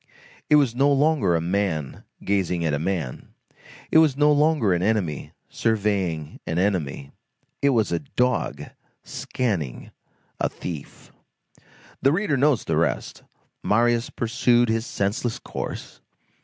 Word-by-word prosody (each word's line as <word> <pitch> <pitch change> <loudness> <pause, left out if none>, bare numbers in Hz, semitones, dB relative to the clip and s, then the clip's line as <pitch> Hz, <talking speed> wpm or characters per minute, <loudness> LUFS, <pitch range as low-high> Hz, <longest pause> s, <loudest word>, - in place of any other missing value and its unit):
It 150 - +6
was 140 -6 +4
no 140 +3 +3
longer 140 - +3
a 80 - +1
man 85 -5 -2 0.2
gazing 90 -4 0
at 75 - 0
a 75 - 0
man; 80 -6 -4 0.6
it 160 - +7
was 155 -4 +3
no 150 0 +5
longer 150 - +3
an 90 - 0
enemy 95 -8 -1 0.2
surveying 100 -8 -1
an 80 - -2
enemy. 85 -8 -1 0.5
It 140 - +4
was 115 -8 +2
a 85 - +1
dog 125 -3 -1 0.4
scanning 95 - -3 0.5
a - - +1
thief. 80 -5 -8 0.9
The 135 - +4
reader 180 -2 +1
knows 140 -2 +2
the 80 - -1
rest. 75 -7 -1 0.4
Marius 120 +2 +2
pursued 120 0 +2
his 115 +2 0
senseless 110 +4 -1
course. - - -7
105 Hz, 130 wpm, -24 LUFS, 85-130 Hz, 0.9 s, it